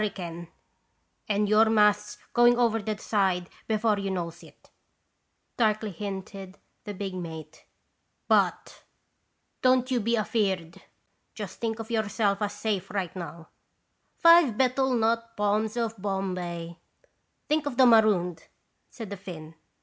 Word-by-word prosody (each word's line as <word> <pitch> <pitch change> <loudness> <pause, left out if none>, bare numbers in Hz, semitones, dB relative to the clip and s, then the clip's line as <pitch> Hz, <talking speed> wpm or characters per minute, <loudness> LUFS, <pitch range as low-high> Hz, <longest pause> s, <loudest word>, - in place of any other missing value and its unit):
ricane 175 -5 -4 0.8
and 210 0 +1
your 215 +2 +5
masts 210 -1 +2 0.2
going 240 0 +5
over 230 -2 +2
the 215 +1 -3
side 190 -5 0 0.2
before 215 -1 +1
you 195 0 -3
knows 170 -3 -4
it," - - -19 0.9
darkly 215 -2 +1
hinted 195 0 -7 0.3
the 205 - -5
big 195 0 -5
mate, 165 -4 -8 0.3
" - - -48
but - - -1 0.8
don't 255 0 +3
you 250 - +2
be 230 +2 0
afeard. 195 -6 -1 0.5
Just - - -7
think 225 -1 -2
of 225 0 -7
yourself 215 -2 0
as 205 -1 -1
safe 205 -2 -3
right 190 -3 -3
among 170 -2 -7 0.3
" - - -48
' - - -46
Five 335 -9 +7
betel 260 0 +2
nut 230 0 0
palms 210 +2 0
of 225 -3 -2
Bombay.' 180 -4 -4 0.2
" - - -38
" - - -48
Think 300 -1 0
of 255 -4 -4
the 260 - +7
marooned," 205 -8 +3 0.4
said 225 -4 -9
the 200 - -5
Finn. 165 -4 -9
210 Hz, 145 wpm, -27 LUFS, 185-225 Hz, 0.9 s, Five